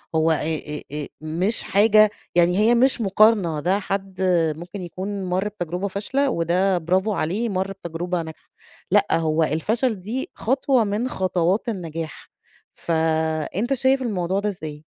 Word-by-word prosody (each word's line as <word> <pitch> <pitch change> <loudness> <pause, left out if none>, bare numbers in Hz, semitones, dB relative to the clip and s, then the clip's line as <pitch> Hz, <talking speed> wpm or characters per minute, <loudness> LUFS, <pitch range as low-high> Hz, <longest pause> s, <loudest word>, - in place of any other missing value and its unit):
هو 160 +1 +3
آآ، 150 -1 -2
آآ، 150 -1 -4
مش 175 +8 -1
حاجة 215 +1 +5 0.3
يعني 175 +1 +4
هي 225 +3 +4
مش 255 0 +3
مقارنة، 195 -5 +3
ده 185 +6 +1
حد 195 -1 -4
آآ، 170 -4 +2
ممكن 180 +5 -8
يكون 190 +3 -5
مَرّ 185 +3 0
بتجربة 180 -1 -4
فاشلة، 260 +8 -1
وده 180 +1 +1
برافو 185 +5 +1
عليه 200 +8 -1
مَرّ 190 0 -1
بتجربة 170 +1 -2
ناجحة، 160 -1 -11 0.4
لأ، - - +5
هو 160 0 +1
الفَشَل 210 - 0
دي 245 - -4
خطوة 265 0 +2
من 210 +5 -1
خطوات 185 +4 0
النجاح، 165 -6 -6 0.5
ف 170 - -6 0.6
أنت 240 +7 0
شايف 265 +1 +2
الموضوع 190 -5 -1
ده 210 +1 -1
إزاي؟ 155 -5 -7
190 Hz, 150 wpm, -23 LUFS, 165-215 Hz, 0.6 s, حاجة